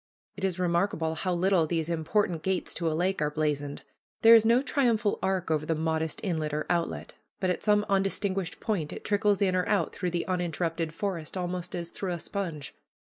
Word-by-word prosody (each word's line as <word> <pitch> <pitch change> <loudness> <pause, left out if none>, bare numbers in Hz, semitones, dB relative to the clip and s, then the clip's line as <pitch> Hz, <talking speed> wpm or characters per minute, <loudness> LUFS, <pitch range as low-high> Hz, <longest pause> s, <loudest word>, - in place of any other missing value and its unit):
It 195 - -9
is 185 -2 0
remarkable 170 -2 0
how 185 +3 -2
little 180 -2 +3
these 160 -1 -1
important 170 +1 0
gates 190 +2 -1
to 165 -2 -1
a 155 - -1
lake 185 0 0
are 150 - +2
blazoned. 150 -2 -2 0.4
There 225 +1 +10
is 225 -1 +7
no 240 +3 +4
triumphal 235 -7 +1
arch 190 -3 0
over 155 -1 +1
the 160 +1 0
modest 160 0 -1
inlet 155 -5 -1
or 150 - -2
outlet, 170 -1 -2 0.3
but 185 -2 +1
at - - -3
some 210 -1 +3
undistinguished 195 -1 0
point 190 -9 -2
it - - -8
trickles 205 -1 +2
in 185 -2 +2
or 180 - 0
out - - +1
through 180 - -2
the 170 0 -2
uninterrupted 170 -2 -1
forest, 175 -2 -4
almost 180 0 -3
as 170 -1 -4
through 185 -3 -3
a - - -3
sponge. 170 -6 -4
180 Hz, 200 wpm, -28 LUFS, 160-195 Hz, 0.4 s, There